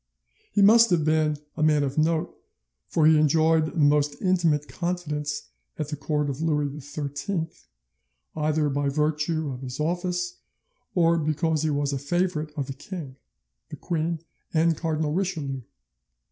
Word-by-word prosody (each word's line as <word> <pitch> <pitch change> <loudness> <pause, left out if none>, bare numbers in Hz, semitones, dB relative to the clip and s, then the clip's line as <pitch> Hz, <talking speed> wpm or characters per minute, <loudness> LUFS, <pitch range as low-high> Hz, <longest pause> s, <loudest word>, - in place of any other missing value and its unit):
He 205 - +3
must 230 +3 +7
have 165 -4 +2
been 155 -1 +2 0.2
a 155 - -4
man 155 -1 +4
of 135 -1 -2
note, 160 +1 +1 0.5
for 160 - +2
he 155 -1 +6
enjoyed 155 +1 +3
the 170 - -8
most 145 -1 +3
intimate 170 -6 +2
confidence 150 - -3 0.3
at 150 -2 -3
the 150 - -3
court 150 +1 -1
of 140 +1 -4
Louis 150 -2 0
XIII, 145 +5 -3 0.9
either 155 0 +1
by 140 0 0
virtue 150 +1 0
of 125 0 -7
his 130 +1 -6
office 180 - -1 0.6
or 170 -1 +4
because 155 0 0
he 160 - +1
was 145 -1 0
a 135 - -1
favourite 160 +1 -1
of 140 - -1
the 135 - -6
king, 140 -2 -8 0.5
the - - -6
queen, 165 -1 -2 0.3
and 165 +1 +3
Cardinal 155 -2 -1
Richelieu. 160 -8 -2
155 Hz, 150 wpm, -26 LUFS, 145-165 Hz, 0.9 s, must